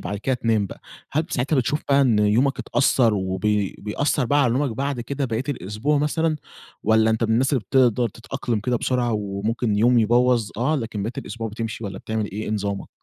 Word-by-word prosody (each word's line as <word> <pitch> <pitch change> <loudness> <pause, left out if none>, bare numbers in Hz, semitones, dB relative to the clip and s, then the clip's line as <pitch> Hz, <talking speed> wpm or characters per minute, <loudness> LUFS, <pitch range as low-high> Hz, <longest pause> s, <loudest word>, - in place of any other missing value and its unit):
بعد 100 +3 -4
كده 130 +4 0
تنام 110 -4 +1
بقى، - - -11 0.3
هل 155 +3 +2
ب 165 - -14
ساعتها 135 +4 0
بتشوف 135 +4 0
بقى 140 0 +5
إن 120 -6 +3
يومك 115 +7 +2
اتأثر 125 -5 +2
وبي 95 +1 -1
بيأثر 125 +6 0
بقى 145 +3 +3
على 120 -3 +2
نومك 135 +1 0
بعد 140 -1 -2
كده 140 +3 -3
باقية 115 0 -1
الأسبوع 110 - -1
مثلًا؟ 155 +1 0 0.5
والّا 110 0 +4
أنت 110 +1 +1
من 110 - -1
الناس 130 +5 +2
اللي 130 - +2
بتقدر 125 -3 +3
تتأقلم 115 0 -4
كده 125 +3 0
بسرعة 120 -1 0
وممكن 105 +2 -1
يوم 120 +3 +4
يبوَظ 120 0 +3
آه، 135 +7 +1
لكن 110 -6 -4
باقية 115 +4 -4
الأسبوع 115 -1 -5
بتمشي 115 +1 -5
والّا 95 -1 -5
بتعمل 110 -1 -2
إيه؟ 105 +2 -4
إيه - - -4
نظامك؟ 100 -2 -3
115 Hz, 205 wpm, -23 LUFS, 105-130 Hz, 0.5 s, بقى